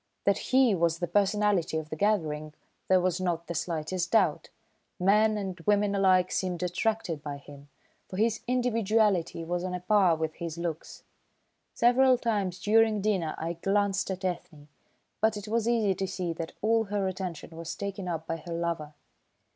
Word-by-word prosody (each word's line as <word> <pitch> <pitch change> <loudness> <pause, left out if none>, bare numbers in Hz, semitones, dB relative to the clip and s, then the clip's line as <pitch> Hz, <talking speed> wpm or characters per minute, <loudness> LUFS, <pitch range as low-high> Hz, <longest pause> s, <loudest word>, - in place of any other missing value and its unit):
That 200 - +2
he 260 -4 +5
was 170 -2 +1
the 175 - -1
personality 200 -2 +1
of 155 -1 -6
the - - -2
gathering 155 -6 -1 0.3
there 185 -1 +5
was 180 0 0
not 170 -2 -1
the 170 - -5
slightest 170 +2 -2
doubt. 225 - +2 0.5
Men 210 +3 +3
and 190 -3 -4
women 205 -1 +3
alike 185 -2 +3
seemed 180 -1 -2
attracted 180 -2 -1
by 145 -1 -5
him, 140 0 -14 0.4
for 185 - -6
his 220 +1 +1
individuality 220 -8 +1
was 175 +1 -2
on 185 -1 -3
a - - -3
par 185 -2 +3
with 160 0 -3
his 170 -1 -5
looks. 170 -2 -5 0.7
Several 250 +2 +5
times 205 -7 -1
during 220 +1 +3
dinner 190 -7 0
I 165 +1 -3
glanced 195 +3 0
at 190 0 -4
Ethne, 170 -4 -5 0.5
but 220 -1 +2
it 205 0 -7
was 230 +1 0
easy 220 -5 +2
to 190 +1 -3
see 180 -2 -3
that 165 0 -6
all 225 +1 +3
her 200 -1 -1
attention 180 -4 -5
was 165 0 -6
taken 200 -2 -5
up 165 -2 -3
by 165 - -3
her 170 +1 -7
lover. 165 -3 -3
185 Hz, 170 wpm, -28 LUFS, 170-210 Hz, 0.7 s, he